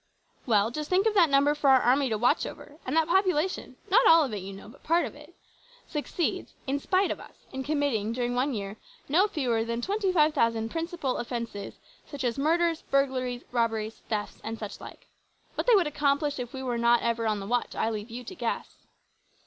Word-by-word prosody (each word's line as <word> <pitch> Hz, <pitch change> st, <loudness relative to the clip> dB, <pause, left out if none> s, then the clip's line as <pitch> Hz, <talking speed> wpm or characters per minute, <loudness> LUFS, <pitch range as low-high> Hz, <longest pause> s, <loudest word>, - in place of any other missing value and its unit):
"Well, 215 Hz, -1 st, +3 dB
just 300 Hz, +3 st, -5 dB
think 375 Hz, +3 st, +3 dB
of 445 Hz, -, +3 dB
that 355 Hz, -6 st, +5 dB
number 280 Hz, +1 st, +4 dB
for 295 Hz, -2 st, +1 dB
our 265 Hz, -1 st, +7 dB
army 260 Hz, +2 st, +3 dB
to 220 Hz, -, 0 dB
watch 245 Hz, +7 st, +2 dB
over; 295 Hz, +1 st, -11 dB
and 280 Hz, +5 st, 0 dB
that 320 Hz, -1 st, +3 dB
population 370 Hz, -1 st, +1 dB, 0.2 s
not -, -, +6 dB
all 325 Hz, -1 st, +7 dB
of 260 Hz, -6 st, -3 dB
it, 205 Hz, -, -2 dB
you 195 Hz, +1 st, -7 dB
know, 195 Hz, +1 st, -11 dB
but 225 Hz, -, -15 dB
part 335 Hz, +2 st, +2 dB
of -, -, -7 dB
it 300 Hz, +4 st, -15 dB, 0.5 s
succeeds 310 Hz, +2 st, -3 dB
in 275 Hz, +1 st, -1 dB
spite 375 Hz, +6 st, +1 dB
of -, -, -4 dB
us -, -, -15 dB
in 265 Hz, -, -3 dB
committing, 280 Hz, -8 st, 0 dB
during 245 Hz, 0 st, -1 dB
one 255 Hz, +2 st, 0 dB
year, 200 Hz, 0 st, -5 dB, 0.3 s
no 360 Hz, +9 st, +4 dB
fewer 250 Hz, -, 0 dB
than 230 Hz, +1 st, -3 dB
25,000 300 Hz, -, +1 dB
`Principal' 330 Hz, -5 st, -2 dB
offences 235 Hz, -4 st, -5 dB, 0.3 s
such 285 Hz, -3 st, -6 dB
as 240 Hz, +1 st, -1 dB
murders, 330 Hz, +2 st, +2 dB
burglaries, 255 Hz, -3 st, 0 dB
robberies, 225 Hz, -2 st, -1 dB
thefts, 210 Hz, -2 st, -3 dB
and 225 Hz, +1 st, -4 dB
such 210 Hz, -2 st, -7 dB
like. -, -, -11 dB, 0.5 s
What -, -, -3 dB
they 480 Hz, -, +7 dB
would 380 Hz, -4 st, +4 dB
accomplish 290 Hz, -1 st, 0 dB
if 245 Hz, -1 st, -5 dB
we 265 Hz, 0 st, -6 dB
were 245 Hz, -2 st, -1 dB
not 235 Hz, 0 st, +4 dB
ever 230 Hz, -1 st, 0 dB
on 210 Hz, -1 st, 0 dB
the 195 Hz, -, -6 dB
watch 245 Hz, +4 st, -1 dB
I 225 Hz, -, 0 dB
leave 215 Hz, +1 st, -5 dB
you 240 Hz, +2 st, -7 dB
to 370 Hz, -, -8 dB
guess. -, -, -5 dB
265 Hz, 205 wpm, -28 LUFS, 230-315 Hz, 0.5 s, our